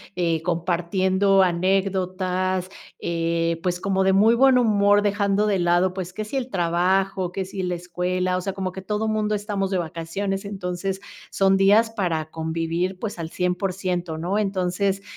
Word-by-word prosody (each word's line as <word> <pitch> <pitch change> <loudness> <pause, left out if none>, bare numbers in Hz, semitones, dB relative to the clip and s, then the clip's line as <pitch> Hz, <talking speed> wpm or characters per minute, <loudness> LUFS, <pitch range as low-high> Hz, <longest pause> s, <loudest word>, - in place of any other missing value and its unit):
eh, 165 -3 0
compartiendo 185 +3 +2
anécdotas, 185 0 0 0.3
eh, 165 0 -1
pues 180 -1 -1
como 190 0 0
de 190 0 +3
muy 215 +4 +5
buen 265 +1 +5
humor 205 -3 +4
dejando 205 0 +1
de 200 -2 +1
lado 175 +1 +2
pues 185 -1 -5
que 215 +2 -4
si 240 +6 -4
el 260 -1 -3
trabajo, 185 0 +1
que 190 +1 -3
si 190 0 -5
la 180 -1 -1
escuela, 180 +1 -1
o - - -2
sea 195 +1 -3
como 190 -1 -3
que 190 - -8
todo 210 +3 -2
mundo 215 -1 0
estamos 200 -2 -2
de 190 - +1
vacaciones, 180 +4 -3
entonces 190 -1 -4 0.3
son 195 0 +3
días 205 +4 +5
para 170 -8 -2
convivir 165 +3 -2
pues 210 -4 -5
al 165 -1 -4
100 180 +1 -1
por 195 0 -2
100 180 -2 -2 0.2
¿no? 180 +5 -1
Entonces, 195 -1 0
185 Hz, 170 wpm, -23 LUFS, 180-200 Hz, 0.3 s, muy